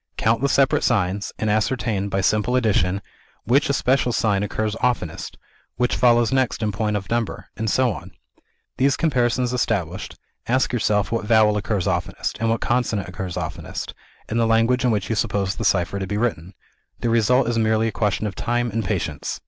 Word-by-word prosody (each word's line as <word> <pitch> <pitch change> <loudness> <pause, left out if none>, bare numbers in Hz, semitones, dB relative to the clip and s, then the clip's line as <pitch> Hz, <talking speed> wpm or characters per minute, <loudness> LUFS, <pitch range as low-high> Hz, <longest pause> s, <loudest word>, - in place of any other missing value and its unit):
Count 115 +1 +1
the 140 - +2
separate 135 -1 +3
signs, 100 -3 0
and 110 - -2
ascertain, 110 -1 0
by 95 0 0
simple 110 +5 +1
addition, 100 -5 +1 0.4
which 135 +6 +2
especial 130 -2 +2
sign 105 -4 +1
occurs 110 +1 -2
oftenest 120 -11 -2 0.4
which 125 0 +1
follows 120 -1 +4
next 130 -4 0
in 105 - 0
point 105 +1 -1
of 95 -2 -7
number 115 -2 -2
and 110 -1 -2
so 125 +1 +2
on. - - -9 0.7
These 135 +1 +2
comparisons 125 -5 +1
established, 95 -8 -2 0.3
ask 130 +1 +1
yourself 105 -4 +1
what 115 -2 -1
vowel 110 -1 +4
occurs 100 -2 -1
oftenest, 100 - -2
and 115 0 0
what 115 0 0
consonant 115 -6 0
occurs 90 -1 -5
oftenest, - - -5 0.3
in 115 - -2
the 115 -1 +2
language 115 +3 +3
in 125 - +3
which 105 -4 0
you 110 - -1
suppose 100 -3 -1
the 110 - -4
cipher 100 -1 +1
to 95 - -3
be 105 - -2
written. 95 -6 -2 0.5
The 120 - 0
result 115 +2 +3
is 115 -1 0
merely 110 0 +2
a - - -1
question 105 0 -1
of 105 - -3
time 120 +3 -1
and 115 +2 -1
patience." 85 -7 -3
110 Hz, 185 wpm, -22 LUFS, 100-120 Hz, 0.7 s, follows